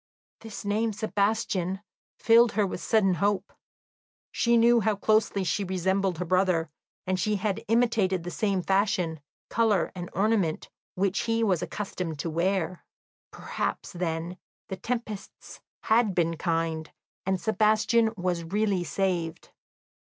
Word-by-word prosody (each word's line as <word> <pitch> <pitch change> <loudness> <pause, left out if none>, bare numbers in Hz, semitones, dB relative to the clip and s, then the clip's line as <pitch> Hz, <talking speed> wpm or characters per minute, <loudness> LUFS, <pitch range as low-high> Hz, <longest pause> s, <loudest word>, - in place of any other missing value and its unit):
This 220 -2 -9
name 215 +2 0
"Sebastian" 200 -3 -1 0.4
filled 230 0 +5
her 210 0 +2
with 185 - -5
sudden 200 -4 +3
hope; 200 +1 0 0.8
she 235 0 +2
knew 235 +1 +5
how 215 -1 +1
closely 210 -1 +2
she 195 +3 0
resembled 190 0 0
her 180 - -3
brother, 180 -3 +1 0.3
and 185 0 -1
she 210 +4 +1
had 200 0 -2
imitated 220 -6 +2
the 175 - -5
same 195 -3 0
fashion, 190 -5 +1 0.3
colour, 220 -5 +2
and 175 -1 -6
ornament 195 -5 0 0.2
which 195 +1 0
he 225 0 +2
was 185 -6 +2
accustomed 180 -6 -4
to 165 +3 -3
wear. 180 +1 -1 0.5
Perhaps, - - -4
then, 170 0 -3 0.3
the 190 - -3
tempests 220 0 -6 0.2
had 220 -3 +3
been 165 -1 +1
kind 165 -1 -1 0.4
and 190 -1 +1
Sebastian 220 +2 +2
was 175 -2 -1
really 200 +1 0
saved. 175 -3 -2
195 Hz, 130 wpm, -27 LUFS, 175-215 Hz, 0.8 s, filled